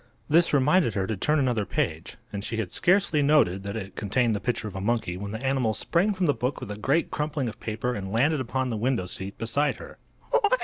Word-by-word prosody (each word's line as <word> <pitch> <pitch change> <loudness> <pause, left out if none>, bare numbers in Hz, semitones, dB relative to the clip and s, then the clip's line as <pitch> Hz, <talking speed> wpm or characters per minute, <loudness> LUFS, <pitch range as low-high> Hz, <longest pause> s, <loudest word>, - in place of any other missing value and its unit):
This 165 +3 +4
reminded 145 - +3
her 95 -2 0
to 110 - -2
turn 150 +11 +1
another 125 -6 +1
page, - - -3 0.2
and 100 -1 -4
she 115 - -3
had 110 -5 -2
scarcely 180 -4 +3
noted 140 -11 +3
that 100 +1 -5
it 100 -3 -6
contained 110 +2 +1
the - - -2
picture 115 -1 -2
of 100 - -8
a 95 - -4
monkey 105 -4 -1
when 100 +2 -6
the 110 +5 -5
animal 130 -5 +1
sprang 180 +5 +1
from 185 -1 0
the 145 - +3
book 125 +2 -2
with 105 - -7
a - - -4
great 135 +10 0
crumpling 150 -3 -2
of 110 - -7
paper 115 +3 -2
and 95 -3 -5
landed 140 +7 +2
upon 130 +1 -2
the 110 - -2
window 115 -3 0
seat 95 +2 -4
beside 140 +6 +1
her. - - -12
120 Hz, 230 wpm, -26 LUFS, 105-145 Hz, 0.2 s, This